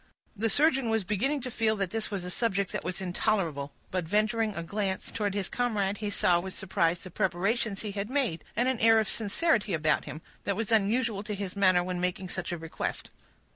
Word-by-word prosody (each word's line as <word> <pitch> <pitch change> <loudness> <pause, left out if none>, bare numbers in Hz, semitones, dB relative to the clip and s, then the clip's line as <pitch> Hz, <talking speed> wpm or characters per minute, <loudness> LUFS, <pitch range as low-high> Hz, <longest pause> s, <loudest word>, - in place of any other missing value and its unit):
The 225 +2 0
surgeon 270 0 +3
was 225 -2 +1
beginning 245 +10 0
to 250 0 -5
feel 220 -1 +2
this 210 +2 -2
was 195 -4 -4
a 180 - -5
subject 200 -3 0
that - - -3
was 185 +1 -3
intolerable, 175 -6 0 0.2
but 185 -1 0
venturing 215 +3 +1
a 170 - -3
glance 195 +1 -2
towards 205 -2 -1
his 200 -2 -1
comrade, 210 -5 0
he 210 -1 -2
saw 180 -3 +3
with 190 +1 -6
surprise 175 -3 0
the 185 - -9
preparations 195 +3 0
he 210 - -3
had 200 +1 -3
made, 255 - 0
and 245 - +2
an 260 -3 +1
air 225 0 +6
of 215 - 0
sincerity 215 - +1
about 155 -1 +1
him, 155 - -7 0.2
that 200 - 0
was 225 +1 -2
unusual 220 0 +2
to 210 0 -4
his 200 -1 -5
manner 185 -3 +4
when 180 0 -3
making 180 +1 -2
such 185 -1 -3
a 175 - -2
request. 165 0 -4
200 Hz, 210 wpm, -29 LUFS, 185-225 Hz, 0.2 s, air